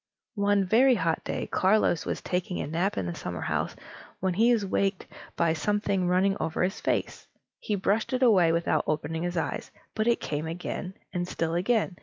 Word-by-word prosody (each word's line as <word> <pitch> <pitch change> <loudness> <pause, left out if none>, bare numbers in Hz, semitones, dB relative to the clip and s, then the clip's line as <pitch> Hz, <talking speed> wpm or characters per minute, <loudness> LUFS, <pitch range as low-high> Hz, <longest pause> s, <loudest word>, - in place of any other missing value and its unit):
One 200 -1 +3
very 245 +7 +5
hot 165 -5 0
day, - - -3
Carlos 190 -4 +2
was - - -2
taking 180 0 -2
a - - -2
nap 170 +7 -1
in 95 - -1
the 85 - -3
summerhouse, - - -3 0.4
when 190 0 0
he 225 +6 +4
was 225 -4 +2
waked 195 0 0 0.3
by 170 -1 +2
something 195 +2 0
running 190 +2 +3
over 160 +2 -1
his 190 +2 -2
face. - - -2 0.3
He 210 - -2
brushed 200 +3 0
it 255 0 +1
away 185 -9 +5
without 170 +1 +1
opening 160 +1 -2
his 175 0 -2
eyes, - - -2 0.2
but 215 +1 -1
it 235 - +3
came 150 +1 -3
again, 180 +2 -5 0.2
and 175 -1 -2
still 165 -2 -2
again. 190 +1 +1
185 Hz, 185 wpm, -27 LUFS, 170-205 Hz, 0.4 s, very